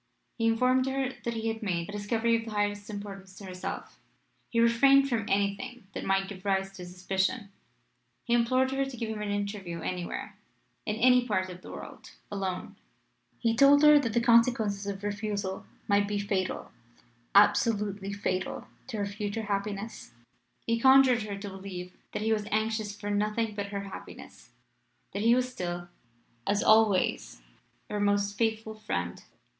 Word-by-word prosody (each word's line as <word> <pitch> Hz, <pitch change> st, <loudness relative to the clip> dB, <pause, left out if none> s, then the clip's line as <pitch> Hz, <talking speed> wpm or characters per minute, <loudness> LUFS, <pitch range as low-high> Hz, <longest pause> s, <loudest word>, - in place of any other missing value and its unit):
He 225 Hz, -, +2 dB
informed 255 Hz, +3 st, +3 dB
her 265 Hz, -1 st, -1 dB
that 235 Hz, -1 st, -1 dB
he 225 Hz, 0 st, -2 dB
had 225 Hz, 0 st, -2 dB
made 175 Hz, -5 st, -1 dB
a -, -, -7 dB
discovery 225 Hz, +3 st, +1 dB
of 225 Hz, 0 st, -2 dB
the -, -, -6 dB
highest 205 Hz, -1 st, -1 dB
importance 195 Hz, -2 st, -8 dB
to 200 Hz, -, -10 dB
herself 185 Hz, -1 st, -6 dB, 0.5 s
he 230 Hz, -, 0 dB
refrained 270 Hz, +4 st, +5 dB
from 225 Hz, -5 st, -1 dB
anything 200 Hz, +3 st, -1 dB
that -, -, -5 dB
might 195 Hz, 0 st, +1 dB
give 190 Hz, -2 st, -9 dB
rise 195 Hz, -1 st, 0 dB
to 185 Hz, -2 st, -9 dB
suspicion; 190 Hz, +4 st, -1 dB, 0.7 s
he 235 Hz, -, -1 dB
implored 255 Hz, +2 st, +3 dB
her 270 Hz, 0 st, +1 dB
to 270 Hz, -2 st, -6 dB
give 230 Hz, -1 st, -3 dB
him 215 Hz, -1 st, -5 dB
an 210 Hz, -, -3 dB
interview 200 Hz, -4 st, -3 dB
anywhere, 180 Hz, 0 st, -4 dB, 0.5 s
in 210 Hz, -, 0 dB
any 250 Hz, +2 st, +4 dB
part 185 Hz, -4 st, 0 dB
of 180 Hz, 0 st, -10 dB
the -, -, -11 dB
world -, -, -9 dB, 0.2 s
alone, 190 Hz, -2 st, -4 dB, 0.6 s
he 230 Hz, -1 st, +1 dB
told 280 Hz, +4 st, +6 dB
her 300 Hz, -1 st, +8 dB
that 230 Hz, -6 st, -2 dB
the 235 Hz, -, +3 dB
consequences 230 Hz, -4 st, +3 dB
of 200 Hz, 0 st, -4 dB
refusal 205 Hz, -2 st, -3 dB, 0.2 s
might 200 Hz, 0 st, +3 dB
be 205 Hz, 0 st, -1 dB
fatal 200 Hz, -2 st, -2 dB, 0.6 s
absolutely 205 Hz, -1 st, +3 dB
fatal 190 Hz, -2 st, -3 dB, 0.2 s
to 240 Hz, -4 st, -5 dB
her 205 Hz, -, 0 dB
future 205 Hz, +2 st, -4 dB
happiness: 200 Hz, -, -4 dB, 0.5 s
he 230 Hz, 0 st, +1 dB
conjured 265 Hz, -1 st, +6 dB
her 205 Hz, -2 st, -5 dB
to 200 Hz, +1 st, -7 dB
believe 190 Hz, -2 st, -7 dB, 0.2 s
that -, -, -2 dB
he 220 Hz, 0 st, +2 dB
was 210 Hz, -1 st, -2 dB
anxious 215 Hz, -1 st, -1 dB
for 205 Hz, 0 st, -3 dB
nothing 210 Hz, +2 st, 0 dB
but 205 Hz, -1 st, -4 dB
her 200 Hz, 0 st, -4 dB
happiness: 195 Hz, -1 st, -10 dB, 0.6 s
that 200 Hz, -, -2 dB
he 230 Hz, +2 st, +5 dB
was 255 Hz, 0 st, +1 dB
still, 175 Hz, -5 st, -4 dB, 0.6 s
as 205 Hz, 0 st, +2 dB
always, 215 Hz, -, +3 dB, 0.4 s
her 210 Hz, -, -3 dB
most 205 Hz, 0 st, +1 dB
faithful 220 Hz, 0 st, -1 dB
friend. 90 Hz, -, -4 dB
205 Hz, 165 wpm, -29 LUFS, 200-230 Hz, 0.7 s, her